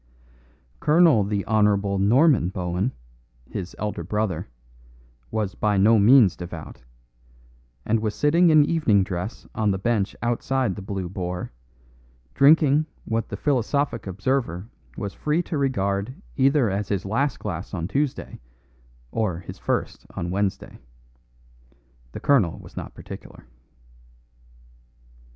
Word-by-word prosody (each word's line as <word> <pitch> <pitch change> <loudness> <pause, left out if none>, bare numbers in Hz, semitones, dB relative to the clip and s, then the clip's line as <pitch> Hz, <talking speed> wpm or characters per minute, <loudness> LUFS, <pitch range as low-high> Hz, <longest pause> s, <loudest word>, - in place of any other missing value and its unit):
Colonel 155 - +5
the 100 0 -2
Hon. 105 -2 +2
Norman 130 - +4
Bohun, 90 +4 -2 0.6
his 95 -4 -6
elder 105 -5 -3
brother, 100 -2 -2 0.8
was 105 -3 -2
by 105 -1 0
no 110 +3 +5
means 110 -3 +6
devout, 80 -6 -8 1.0
and 115 +1 +2
was 110 -1 -2
sitting 165 +4 +4
in 155 -2 +6
evening 145 -12 +2
dress 95 +2 -5
on 110 -1 0
the 95 - +1
bench 105 0 0
outside 120 -1 0
"The 100 - -7
Blue 95 -1 -4
Boar," 90 -1 -5 0.8
drinking 150 +1 +5 0.2
what 115 0 -2
the - - -5
philosophic 140 -2 0
observer 100 -1 -1 0.3
was 100 -1 -4
free 155 +3 0
to 160 - -3
regard 100 -4 -1 0.2
either 135 -2 +3
as 100 +1 -2
his 100 -2 -1
last 120 +6 0
glass 90 +5 -5
on 85 -4 -3
Tuesday 140 +4 -2 0.7
or 105 -7 -1
his 90 - -10
first - - -3
on 85 0 -3
Wednesday. 100 0 -2 1.3
The - - -6
colonel 115 - +3
was - - -14
not - - -7
particular. - - -11
105 Hz, 125 wpm, -24 LUFS, 95-135 Hz, 1.3 s, means